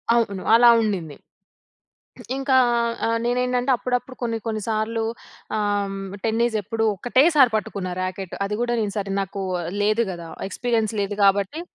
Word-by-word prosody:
అవును. 200 Hz, -5 st, 0 dB
అలా 240 Hz, +1 st, +7 dB
ఉండింది. 180 Hz, -9 st, -2 dB, 1.2 s
ఇంకా 270 Hz, 0 st, 0 dB, 0.5 s
ఆహ్, 230 Hz, 0 st, +1 dB
నేనేంటంటే 250 Hz, +1 st, 0 dB
అప్పుడప్పుడు 250 Hz, +1 st, -3 dB
కొన్ని, 230 Hz, -1 st, -1 dB
కొన్ని 215 Hz, -2 st, -2 dB
సార్లు 225 Hz, +1 st, -1 dB, 0.5 s
ఆహ్, 205 Hz, -1 st, 0 dB, 0.3 s
టెన్నిస్ 225 Hz, 0 st, +1 dB
ఎప్పుడూ 225 Hz, +3 st, -2 dB
ఒకటే‌సారి 260 Hz, -, +4 dB
పట్టుకున్న 200 Hz, -3 st, -4 dB
రాకెట్. 185 Hz, 0 st, -5 dB
అది 210 Hz, -, -3 dB
కూడా 240 Hz, 0 st, 0 dB
నేను 205 Hz, -2 st, -2 dB
సరే, 200 Hz, -1 st, -3 dB
నాకు 195 Hz, 0 st, -4 dB, 0.4 s
లేదు 215 Hz, +3 st, +2 dB
కదా! 170 Hz, -1 st, -8 dB, 0.2 s
ఎక్స్పీరియన్స్ 225 Hz, -1 st, -1 dB
లేదు. 200 Hz, 0 st, -2 dB
కాబట్టి 200 Hz, -, +2 dB
220 Hz, 135 wpm, -23 LUFS, 200-240 Hz, 1.2 s, అలా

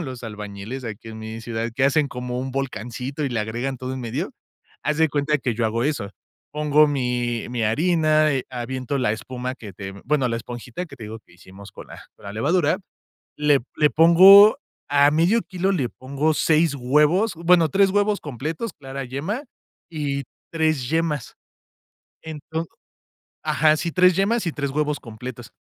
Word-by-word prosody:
los 130 Hz, -6 st, -6 dB
albañiles 105 Hz, +3 st, -7 dB
aquí 115 Hz, 0 st, -7 dB
en 110 Hz, 0 st, -8 dB
mi 110 Hz, +1 st, -7 dB
ciudad, 115 Hz, 0 st, -3 dB
que 130 Hz, -, +1 dB
hacen 140 Hz, +1 st, +3 dB
como 125 Hz, -1 st, -5 dB
un 130 Hz, +1 st, -4 dB
volcancito 130 Hz, +2 st, -4 dB
y -, -, 0 dB
le 120 Hz, -3 st, -2 dB
agregan 120 Hz, +5 st, -3 dB
todo 130 Hz, +1 st, -5 dB
en 130 Hz, -, -5 dB
medio, 125 Hz, -, -3 dB, 0.5 s
haz 150 Hz, 0 st, 0 dB
de 160 Hz, 0 st, +4 dB
cuenta 145 Hz, +1 st, 0 dB
que 125 Hz, -4 st, -2 dB
yo 115 Hz, +1 st, -1 dB
hago 115 Hz, +2 st, 0 dB
eso. 140 Hz, -9 st, -2 dB, 0.4 s
Pongo 150 Hz, 0 st, +3 dB
mi 125 Hz, -4 st, -1 dB
mi 120 Hz, -2 st, -2 dB
harina, 155 Hz, +4 st, +3 dB
eh, 135 Hz, -2 st, -1 dB
aviento 130 Hz, +2 st, -3 dB
la 105 Hz, -5 st, +1 dB
espuma 125 Hz, +3 st, -5 dB
que 105 Hz, -6 st, -10 dB
te, 95 Hz, +1 st, -7 dB
bueno, 140 Hz, -2 st, +1 dB
la 115 Hz, -, -1 dB
esponjita 120 Hz, -, -7 dB
que 135 Hz, -, -13 dB
te 115 Hz, -, -9 dB
digo, 110 Hz, +1 st, -7 dB
que 85 Hz, -, -23 dB
hicimos 95 Hz, +3 st, -14 dB
con -, -, -11 dB
la -, -, -11 dB
con -, -, -20 dB
la 100 Hz, -, -6 dB
levadura, 155 Hz, -, +1 dB, 0.6 s
le 150 Hz, -1 st, +3 dB, 0.2 s
le 150 Hz, -1 st, +4 dB
pongo 190 Hz, -, +8 dB, 0.3 s
a 145 Hz, 0 st, +5 dB
1/2 170 Hz, +9 st, +3 dB
kilo, 190 Hz, +1 st, -2 dB
le 135 Hz, -10 st, 0 dB
pongo 140 Hz, +6 st, -1 dB
6 155 Hz, 0 st, +2 dB
huevos, 150 Hz, -, +2 dB
bueno, 170 Hz, -1 st, +4 dB
3 195 Hz, +5 st, +4 dB
huevos 205 Hz, +1 st, +1 dB
completos, 155 Hz, -, -5 dB
clara 135 Hz, -2 st, -7 dB
yema, 155 Hz, -, -4 dB, 0.4 s
y 140 Hz, -4 st, -3 dB, 0.3 s
3 155 Hz, -6 st, 0 dB
yemas. 160 Hz, -4 st, -1 dB, 0.9 s
Entonces, 160 Hz, +1 st, -6 dB, 0.7 s
ajá, 155 Hz, 0 st, +3 dB
sí, 170 Hz, +2 st, -2 dB
3 180 Hz, -1 st, +4 dB
yemas 205 Hz, +2 st, +1 dB
y 165 Hz, -, -1 dB
3 140 Hz, -2 st, -3 dB
huevos 150 Hz, +1 st, -1 dB
completos, 120 Hz, +1 st, -9 dB
140 Hz, 175 wpm, -23 LUFS, 120-160 Hz, 0.9 s, pongo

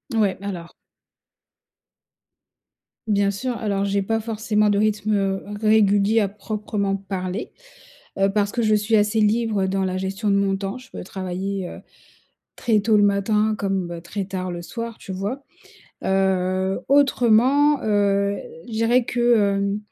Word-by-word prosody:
Ouais, 205 Hz, -4 st, +2 dB
alors 180 Hz, -4 st, -6 dB, 2.4 s
Bien 200 Hz, -1 st, +2 dB
sûr, 245 Hz, +4 st, -3 dB
alors 200 Hz, -2 st, -1 dB
j'ai 200 Hz, 0 st, 0 dB
pas 225 Hz, +2 st, 0 dB
forcément 215 Hz, -1 st, 0 dB
de 200 Hz, -, +2 dB
rythme, 215 Hz, 0 st, +1 dB
heu, 195 Hz, -1 st, -1 dB, 0.2 s
régulier 215 Hz, 0 st, +4 dB
à 205 Hz, -, +2 dB
proprement 205 Hz, -1 st, -3 dB
parler, 190 Hz, 0 st, -5 dB, 0.7 s
heu, 195 Hz, 0 st, +3 dB
parce 205 Hz, 0 st, 0 dB
que 240 Hz, -, -1 dB
je 215 Hz, -1 st, +3 dB
suis 210 Hz, +1 st, +2 dB
assez 210 Hz, +1 st, +2 dB
libre 210 Hz, -2 st, +1 dB
dans 190 Hz, 0 st, 0 dB
la 185 Hz, 0 st, -2 dB
gestion 195 Hz, +3 st, -2 dB
de 200 Hz, -, +3 dB
mon 195 Hz, -1 st, +1 dB
temps. 195 Hz, +5 st, -4 dB
Je 255 Hz, 0 st, -14 dB
peux -, -, -7 dB
travailler 190 Hz, 0 st, -4 dB
heu, -, -, -9 dB, 0.8 s
très 225 Hz, -4 st, +1 dB
tôt 215 Hz, +1 st, +3 dB
le 205 Hz, -, +4 dB
matin, 210 Hz, +2 st, +2 dB
comme 185 Hz, -4 st, -2 dB
très 195 Hz, +3 st, -4 dB
tard 185 Hz, -1 st, -4 dB
le 175 Hz, 0 st, -6 dB
soir 230 Hz, +4 st, -6 dB
tu -, -, -11 dB
vois? 205 Hz, +9 st, -4 dB, 0.6 s
Heu, 190 Hz, 0 st, +1 dB
autrement, 275 Hz, +1 st, +4 dB
heu, 200 Hz, -1 st, +1 dB, 0.3 s
je 235 Hz, -, -10 dB
dirais 230 Hz, +2 st, +2 dB
que, 240 Hz, -, -3 dB
heu, 200 Hz, -4 st, +2 dB
205 Hz, 150 wpm, -22 LUFS, 195-220 Hz, 2.4 s, régulier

